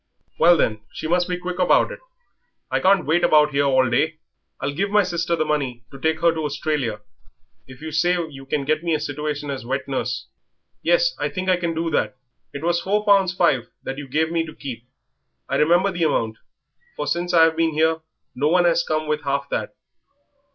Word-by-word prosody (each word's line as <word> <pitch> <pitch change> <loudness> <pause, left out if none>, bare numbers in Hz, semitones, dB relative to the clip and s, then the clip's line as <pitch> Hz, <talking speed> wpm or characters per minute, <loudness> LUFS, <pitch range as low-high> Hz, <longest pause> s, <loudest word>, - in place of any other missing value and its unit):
"Well, 170 +1 +6
then, 110 -7 0
she - - -5
must 175 +2 +1
be 180 - -1
quick 180 0 -5
about 180 - +3
it - - -8 0.7
I - - +2
can't 190 -2 +3
wait 165 +4 +2
about 150 -1 +5
here 140 0 +1
all 130 -2 +3
day." 150 +6 +1 0.4
"I'll 140 - -2
give 195 +7 -1
my 210 0 +4
sister 170 -2 -1
the 155 - 0
money 135 -6 -2
to 135 - -11
take 160 +2 0
her 170 -1 +4
to 160 -1 -3
Australia 140 -7 -2 0.7
if 130 +3 -13
you 160 - -5
say 175 +4 +2
you 135 -3 -12
can 140 0 -1
get 155 +2 0
me 165 -2 +1
a - - -1
situation 145 0 -4
as 135 -3 -5
wet 130 +2 -3
nurse." 135 -1 -3 0.6
"Yes, - - +2
I - - -1
think 185 -1 -3
I 185 - +4
can 170 -2 -2
do 165 0 -1
that. 130 - 0 0.3
It 140 - -7
was 170 0 +1
four 210 +2 0
pounds 195 -3 +4
five 135 -9 +2
that 135 +1 -5
you 145 - -7
gave 160 +4 0
me 165 -1 +1
to 155 - -10
keep. 120 -3 -8 0.6
I - - 0
remember 175 +6 +3
the 170 -2 0
amount, 115 -7 0 0.6
for 150 - -3
since 175 +3 -1
I've 165 -2 +5
been 165 -1 +1
here 160 +1 +2 0.3
no 145 +4 0
one 175 +2 +3
has 170 0 +3
come 155 -2 -2
with 150 0 -1
half 140 0 -2
that. - - -3
160 Hz, 210 wpm, -22 LUFS, 140-175 Hz, 0.7 s, Well